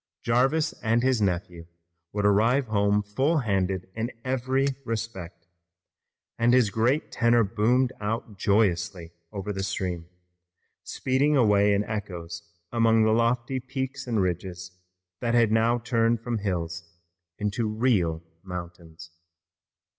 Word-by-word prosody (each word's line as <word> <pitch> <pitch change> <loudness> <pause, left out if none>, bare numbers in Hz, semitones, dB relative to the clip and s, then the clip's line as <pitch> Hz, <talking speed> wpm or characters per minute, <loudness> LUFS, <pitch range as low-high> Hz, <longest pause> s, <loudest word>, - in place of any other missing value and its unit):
Jarvis 135 +7 +2
and 115 +1 +1
his 130 -3 +2
nephew 90 -3 -2 0.4
would 105 0 -1
arrive 115 +7 +3
home 100 -1 +2
full 130 +11 0
handed 95 -7 -1
in 115 +2 -3
every 130 +1 0 0.2
respect, 105 -8 -5 0.9
and 120 +1 +4
his 120 -5 +3
great 125 +8 +1
tenor 120 -1 +3
boomed 120 +5 +1
out 105 0 -3
joyously 95 -3 0 0.2
over 100 0 -4
the 95 - -3
stream, 90 -3 -3 0.7
speeding 140 +3 +1
away 105 -4 +4
in 100 0 +2
echoes 90 -6 -5 0.3
among 115 -1 +3
the 110 - +3
lofty 115 +3 +1
peaks 130 +1 -5
and 110 -5 +1
ridges 90 0 -4 0.5
that 120 0 0
had 115 -2 +4
now 115 +2 +3
turned 115 -1 +1
from 115 -1 -2
hills 85 -3 -4 0.4
into 105 +2 -1
real 105 -8 +1 0.2
mountains. 85 -3 -9
110 Hz, 125 wpm, -26 LUFS, 95-120 Hz, 0.9 s, and